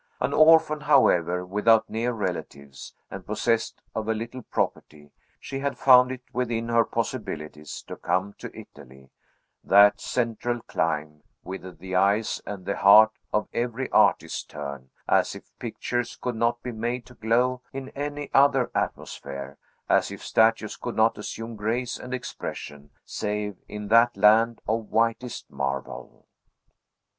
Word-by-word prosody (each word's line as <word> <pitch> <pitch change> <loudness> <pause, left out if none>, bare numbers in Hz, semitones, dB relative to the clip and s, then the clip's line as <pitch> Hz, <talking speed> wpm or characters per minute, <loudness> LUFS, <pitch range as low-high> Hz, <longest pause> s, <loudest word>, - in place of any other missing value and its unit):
An - - -1
orphan, 155 -1 +5
however, 90 - +3
without 105 +4 +3
near 115 +2 -1
relatives, 80 - -6 0.2
and 95 - -7
possessed 110 +3 -1
of 110 -1 -3
a 110 - +1
little 115 +3 -6
property, 75 -9 -4 0.3
she 135 - -6
had 140 0 -2
found 125 -1 +6
it 130 -1 -7
within 115 -2 -2
her 115 0 +4
possibilities 75 - -5
to - - -8
come 95 +3 -1
to - - -7
Italy; 65 +1 -15 0.5
that 100 +1 +6
central 120 0 -2
clime, 75 0 -2 0.2
whither 95 0 -7
the 95 +1 -7
eyes 100 +4 +2
and 100 -3 -6
the - - -2
heart 105 +3 +7 0.2
of 105 0 0
every 120 +2 -2
artist - - +2
turn, 70 -3 -7 0.2
as - - +2
if - - -14
pictures 120 -1 -3
could 125 -2 -3
not 115 +1 0
be 125 - -4
made 120 +2 -3
to 125 - -15
glow 125 +3 +1
in 135 0 -6
any 145 +1 -5
other 135 -3 +4
atmosphere, 70 +1 -5 0.3
as - - +3
if - - -9
statues 110 -1 +2
could 120 - -5
not 110 0 +2
assume 115 +2 -6
grace 115 +4 -2
and 125 - -9
expression, 75 - -6 0.2
save 105 -1 -3
in 105 -1 -7
that 115 0 +5
land 110 +3 +4
of 110 -1 -1
whitest 115 +2 -1
marble. 70 -1 -5
110 Hz, 145 wpm, -25 LUFS, 95-125 Hz, 0.5 s, heart